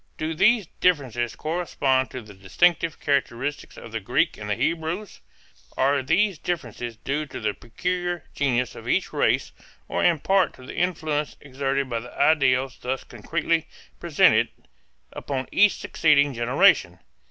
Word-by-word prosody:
Do 155 +1 -2
these 215 +5 +3
differences 130 -9 +1
correspond 145 -5 0
to 130 - -7
the 105 -1 -13
distinctive 155 - +1
characteristics 140 0 -2
of - - -10
the - - -3
Greeks - - 0
and 105 0 -6
the 105 - +1
Hebrews? 165 - -2 0.6
Are 140 +1 +2
these 190 +7 +1
differences 120 -8 -4
due 145 +5 -3
to - - -7
the 110 -2 -1
peculiar 175 - -3
genius 125 -4 0
of - - -11
each - - 0
race - - +1 0.4
or - - -1
in 175 -2 +4
part 190 +5 +1
to 130 - -14
the - - -8
influence 155 -4 -1
exerted 135 0 -2
by 120 -2 -2
the 125 +2 -11
ideals 135 -3 +3
thus 130 +1 -3
concretely 160 +7 -2 0.3
presented - - +4 0.7
upon 135 -2 -4
each 205 0 +5
succeeding 145 -3 +2
generation? 120 +1 +3
140 Hz, 145 wpm, -24 LUFS, 125-165 Hz, 0.7 s, each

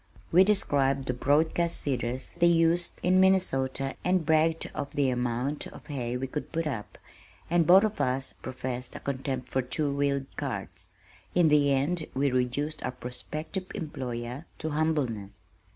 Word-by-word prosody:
We 180 +3 +7
described 140 -9 +1
the 125 - 0
broadcast 160 +6 +1
seeders 125 -2 -2
they 175 - +6
used 170 +1 +3
in 185 +1 +4
Minnesota 135 -8 +2
and 180 -2 +2
bragged 160 +1 +2
of 140 - -4
the 140 -2 +2
amount 125 +3 -2
of - - -13
hay 125 -4 -3
we 130 - -3
could 145 +3 -5
put 165 0 -1
up, 125 -9 -5 0.5
and 170 -2 +3
both 190 +3 +8
of 215 -1 -1
us 130 +1 0
professed 130 -1 -5
a - - -5
contempt 130 -2 -3
for 130 - +1
two 140 +3 -1
wheeled 140 -1 0
carts. - - -3 0.5
In 175 -3 +5
the 145 -1 +4
end 155 +5 +1
we 140 +1 +2
reduced 135 +5 -1
our - - -1
prospective 155 +9 -3
employer 130 - -5
to 160 - -4
humbleness. 145 -10 -1
140 Hz, 155 wpm, -28 LUFS, 130-165 Hz, 0.5 s, both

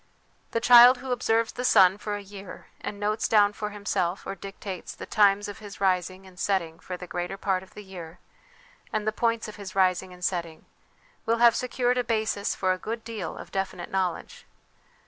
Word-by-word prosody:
The 230 - -1
child 245 +1 +8
who 260 0 -6
observes 230 -2 +1
the 250 - -5
sun 195 -5 +5
for 210 -1 -3
a 205 - -6
year 200 0 -10
and 205 - -6
notes 210 +1 0
down 205 -2 +4
for 210 0 -4
himself, 200 -3 -2
or - - -4
dictates, 195 -1 -8
the - - -8
times 205 -1 +3
of 205 - -8
his 205 -2 -10
rising 185 0 0
and 185 -2 -15
setting 170 -5 -1
for 180 0 -6
the 180 - -8
greater 180 +2 -4
part 190 -2 0
of 190 - -17
the 210 - -9
year, 180 -3 -10 0.7
and 215 -1 -2
the 215 - +1
points 230 0 0
of 215 - -9
his 195 -2 -8
rising 185 -1 +2
and 180 0 -6
setting, 170 -3 -3 0.6
will 230 +1 +2
have 235 0 +6
secured 250 0 0
a - - +1
basis 220 -3 -1
for 185 -1 +1
a 185 - -6
good 225 +3 -5
deal 225 -3 -5
of - - -10
definite 190 -2 -4
knowledge. 185 -3 -3
200 Hz, 200 wpm, -26 LUFS, 185-220 Hz, 0.7 s, child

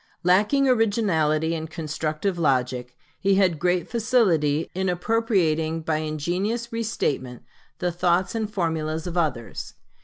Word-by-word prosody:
Lacking 210 +10 +3
originality 185 -10 +2
and 160 -1 -4
constructive 155 +3 -3
logic, 125 -4 0 0.2
he 195 0 +3
had 185 -5 +2
great 180 0 +1
facility 185 - +2
in 190 +1 -1
appropriating 175 -5 +1
by 155 -1 0
ingenious 180 - -2
restatement 145 - -2 0.3
the 180 -1 -1
thoughts 175 +3 +1
and 220 -2 -2
formulas 160 -3 -2
of 175 -1 -5
others. 145 - -2
170 Hz, 120 wpm, -24 LUFS, 155-200 Hz, 0.3 s, Lacking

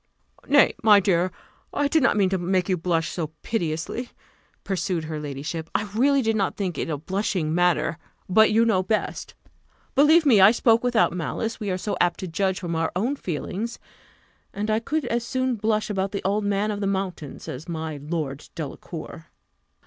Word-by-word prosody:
"Nay, 285 +1 +5
my 210 -2 +7
dear, 185 -2 +1 0.4
I 290 - +1
did 315 +2 +2
not 250 - +3
mean 195 -2 +3
to 190 0 0
make 180 +1 0
you 185 - +2
blush 165 -1 0
so 165 -3 -3 0.2
piteously," 175 +4 -2 0.5
pursued 185 -3 -2
her 155 -1 -4
ladyship: 150 +3 -5
"I 205 -1 -1
really 275 +4 +3
did 225 0 +1
not 195 -3 0
think 185 -4 -2
it - - -2
a 150 - -1
blushing 185 -1 -1
matter 175 -2 +1 0.3
but 220 +4 +5
you 225 +2 +4
know 210 -5 +3
best. 210 +3 -2 0.6
Believe 310 +4 +5
me, 230 -8 +6
I 190 - +9
spoke 230 0 +3
without 245 -6 +3
malice; 200 +7 -3
we 210 -3 -3
are 185 - 0
so 205 +2 -3
apt 175 -1 +2
to 185 - -4
judge 190 +3 -1
from 170 -2 -3
our 160 0 0
own 235 +10 0
feelings 200 - -4 0.8
and 210 +2 -1
I 215 - +2
could 300 +5 -2
as 235 -1 -1
soon 260 +1 -1
blush 215 -1 0
about 195 0 -2
the 200 - -3
old 205 +2 0
man 205 +1 0
of 205 - -4
the 200 - 0
mountains 190 -7 -4
as 135 +5 -6
about 175 - -7
my 160 -2 -4
Lord 145 -1 -4
Delacour." 160 +1 -7
195 Hz, 190 wpm, -24 LUFS, 170-220 Hz, 0.8 s, I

